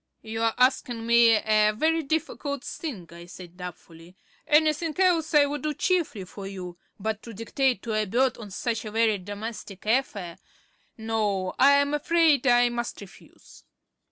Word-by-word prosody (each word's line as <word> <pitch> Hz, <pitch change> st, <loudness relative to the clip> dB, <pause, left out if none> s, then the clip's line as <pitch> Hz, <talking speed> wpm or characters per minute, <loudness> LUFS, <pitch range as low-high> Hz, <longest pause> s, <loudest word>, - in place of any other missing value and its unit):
"You're 225 Hz, 0 st, -1 dB
asking 250 Hz, -2 st, +1 dB
me 235 Hz, 0 st, +6 dB
a 215 Hz, 0 st, +2 dB
very 325 Hz, +4 st, +2 dB
difficult 285 Hz, -2 st, -3 dB
thing," 235 Hz, -, -6 dB
I 170 Hz, 0 st, -12 dB
said 180 Hz, -1 st, -12 dB
doubtfully. 175 Hz, -1 st, -11 dB, 0.3 s
"Anything 310 Hz, +2 st, +2 dB
else 340 Hz, -5 st, +2 dB
I 290 Hz, -1 st, +7 dB
would 290 Hz, +1 st, -4 dB
do 305 Hz, -1 st, -2 dB
cheerfully 330 Hz, -, 0 dB
for 195 Hz, +2 st, -9 dB
you; 180 Hz, -2 st, -8 dB, 0.2 s
but 220 Hz, +1 st, -3 dB
to 230 Hz, -2 st, -10 dB
dictate 245 Hz, +1 st, -1 dB
to 230 Hz, -, -3 dB
a 215 Hz, 0 st, +1 dB
bird 245 Hz, +5 st, +1 dB
on 215 Hz, -3 st, -9 dB
such 225 Hz, +3 st, -3 dB
a 215 Hz, -, -6 dB
very 220 Hz, -1 st, +1 dB
domestic 205 Hz, 0 st, -8 dB
affair 210 Hz, -7 st, -1 dB, 0.6 s
No, 210 Hz, -4 st, -1 dB
I'm 280 Hz, +1 st, +5 dB
afraid 300 Hz, -2 st, +3 dB
I 245 Hz, -1 st, +5 dB
must 240 Hz, 0 st, -4 dB
refuse." 200 Hz, -2 st, -16 dB
230 Hz, 155 wpm, -26 LUFS, 200-285 Hz, 0.6 s, I